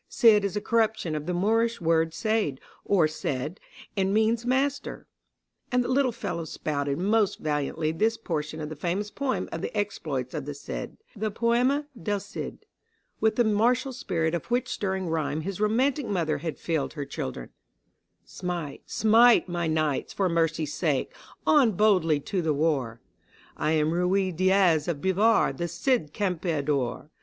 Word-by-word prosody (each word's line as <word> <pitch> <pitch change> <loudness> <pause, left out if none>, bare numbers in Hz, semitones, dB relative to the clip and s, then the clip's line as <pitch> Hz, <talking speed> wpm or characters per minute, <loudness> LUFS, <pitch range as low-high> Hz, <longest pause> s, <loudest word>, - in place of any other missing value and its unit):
Cid 215 -3 +5
is 200 0 -2
a 210 - -1
corruption 220 -7 +1
of 150 +1 -4
the - - 0
Moorish 225 +5 +1
word 165 -1 +2
seyd 210 -5 0 0.3
or 175 -6 +3
said, 150 +1 -4 0.4
and 190 -1 +1
means 225 +3 +2
master. 275 +2 -1 0.7
And 250 0 +3
the 245 - -4
little 260 -1 +2
fellow 170 -7 -4
spouted 145 -3 -2
most 205 +3 +2
valiantly 155 +1 -1
this 220 +8 +1
portion 155 -6 -4
of 150 - -4
the 155 - -6
famous 185 +7 -2
poem 275 -2 -2
of - - -4
the - - -4
exploits 155 -11 -2
of 150 -4 -4
the 145 0 -5
Cid 140 - -6 0.2
(the 215 +1 -2
Poema 240 +6 +1 0.2
del 205 +4 -1
Cid), 200 - -7 0.5
with 220 -1 +2
the 240 - +4
martial 240 +5 +2
spirit 165 -9 -1
of 170 - -3
which 250 +1 0
stirring 190 -2 -2
rhyme 155 -2 -1
his 195 +4 -5
romantic 250 +5 +1
mother 165 -7 0
had 160 +1 -4
filled 160 -4 -2
her 145 -3 -4
children: 65 - -6 0.7
"Smite, 175 -6 -5
smite, 230 +1 +5
my 175 -2 -2
knights, 155 -3 0
for 195 - +1
mercy's 165 -3 0
sake 145 -4 -1 0.3
on 270 -8 +5
boldly 180 -7 +3
to 185 +5 -2
the 155 -3 0
war; 140 -7 0 0.6
I 155 +1 0
am 155 0 +2
Ruy 185 +2 +1
Diaz 185 -3 +3
of 165 -5 -1
Bivar, 200 +6 +3
the 170 - -3
Cid 240 - 0
Campeador! 155 - -1
180 Hz, 160 wpm, -27 LUFS, 155-220 Hz, 0.7 s, Cid